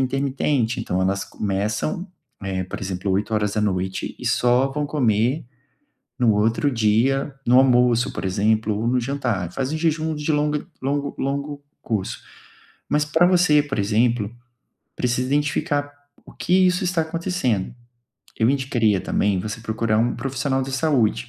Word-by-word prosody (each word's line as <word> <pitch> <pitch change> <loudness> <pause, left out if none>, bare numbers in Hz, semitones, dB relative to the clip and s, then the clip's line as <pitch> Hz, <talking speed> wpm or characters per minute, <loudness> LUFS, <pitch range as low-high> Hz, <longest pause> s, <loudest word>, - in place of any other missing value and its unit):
intermitente, 135 -2 0
então 90 - -1
elas 95 +1 0
começam, 105 - -2 0.3
eh, 95 -1 -2
por - - -7
exemplo, 95 0 -3
20h 105 -2 -1
e - - -6
só 125 +2 +3
vão 150 0 -1
comer 125 -1 +1 0.7
no 115 -4 +4
outro 115 +7 +2
dia 125 +5 +1
no 125 +2 +6
almoço, 125 -2 +4
por - - -5
exemplo, 105 +3 +1
ou 115 - -2
no 125 +1 +2
jantar, 120 -9 -2
fazem 135 +4 -2
jejum 160 -1 0
de 150 +1 -3
longo 150 +1 0 0.2
longo 140 +1 -1
longo 140 +1 -3 0.2
curso. 105 -5 -3 0.7
Mas 150 0 +2
para 160 +3 +3
você, 175 -5 +4
por 135 -6 -4
exemplo, 110 +1 +1 0.6
precisa 125 +1 0
identificar 145 0 0 0.4
o - - -14
que 180 - -2
isso 180 +1 +1
está 180 -2 +1
acontecendo. 160 - -1 0.7
Eu 115 +1 +3
indicaria, 120 -7 +2
também, 100 0 0
você 110 +4 -5
procurar 110 -1 0
um 120 +1 +1
profissional 135 0 -1
da 135 - -5
saúde, 130 - +1
125 Hz, 140 wpm, -22 LUFS, 110-145 Hz, 0.7 s, no